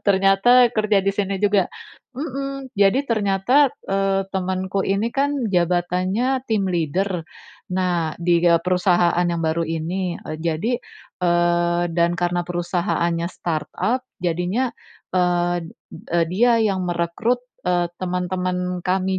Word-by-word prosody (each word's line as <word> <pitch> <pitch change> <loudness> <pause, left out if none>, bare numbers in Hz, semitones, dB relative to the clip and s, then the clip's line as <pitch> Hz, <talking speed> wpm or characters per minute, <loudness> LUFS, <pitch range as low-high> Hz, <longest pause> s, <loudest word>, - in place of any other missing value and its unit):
ternyata 200 +6 +5
kerja 215 -2 +2
di 195 - +2
sini 200 -1 -1
juga," 205 -2 +3 0.5
mhm, 275 -1 -5
jadi 205 +8 +4
ternyata, 230 +6 +3 0.2
eee, 195 0 +1
temanku 190 +1 -1
ini 200 +4 +1
kan 280 -4 0
jabatannya 185 +8 0
tim 205 -4 +1
leader. 175 +1 -1 0.5
Nah, 175 -4 0
di 170 0 +3
ga 170 -1 +5
perusahaan 180 -1 +2
yang 170 -1 -1
baru 160 +1 0
ini, 170 +3 -3 0.2
jadi, 170 +9 -1 0.4
eee, 175 0 +2
dan 170 +1 +2
karena 175 0 0
perusahaannya 175 -1 -1
startup, 175 - -2 0.2
jadinya, 180 +9 0 0.4
eee, 175 -1 +1 0.5
e 175 - +3
dia 230 +5 +3
yang 195 -3 0
merekrut, 175 +8 0 0.3
eee, 175 -1 +2
teman-teman 180 0 -2
kami 190 0 +1
185 Hz, 115 wpm, -22 LUFS, 175-205 Hz, 0.5 s, ternyata